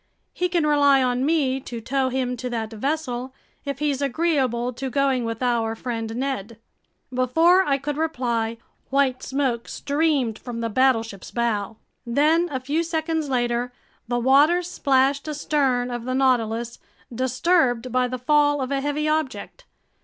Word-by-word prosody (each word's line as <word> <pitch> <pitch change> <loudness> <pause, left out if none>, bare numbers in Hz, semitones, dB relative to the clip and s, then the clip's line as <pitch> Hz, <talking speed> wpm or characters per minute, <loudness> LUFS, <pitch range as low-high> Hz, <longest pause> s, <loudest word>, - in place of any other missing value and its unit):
He 360 0 -1
can 340 -3 +1
rely 285 -2 +4
on 250 0 0
me 280 -5 +1
to 240 -3 -7
tow 260 +3 0
him 255 -1 -1
to 250 +1 -4
that 225 -2 -3
vessel, 260 0 -3 0.3
if 280 -1 -3
he's 285 -1 -1
agreeable 265 -5 0
to 265 +2 -4
going 270 -2 +1
with 230 +2 -4
our 230 -2 0
friend 225 -2 -4
Ned." 235 -4 -3 0.6
Before 325 +9 +4
I 280 -6 +1
could 285 +1 -4
reply, 240 -8 -1 0.3
white 270 -2 +1
smoke 260 -4 -1
streamed 285 -6 0
from 240 -2 -6
the 230 0 -2
battleship's 225 -5 +1
bow. 225 -3 -2 0.3
Then, 305 +8 +2
a 265 -4 -3
few 285 +6 -1
seconds 320 -2 -2
later, 240 -1 0 0.4
the 240 +1 0
waters 290 +8 +4
splashed 275 +1 +2
astern 275 -5 0
of 240 -1 -5
the 255 0 -2
Nautilus, 235 -3 +1 0.3
disturbed 255 0 +1
by 250 0 +2
the 255 +1 -4
fall 290 +3 +3
of 260 0 -3
a 275 -1 0
heavy 290 +2 -1
object. 310 - -2
260 Hz, 155 wpm, -23 LUFS, 240-290 Hz, 0.6 s, rely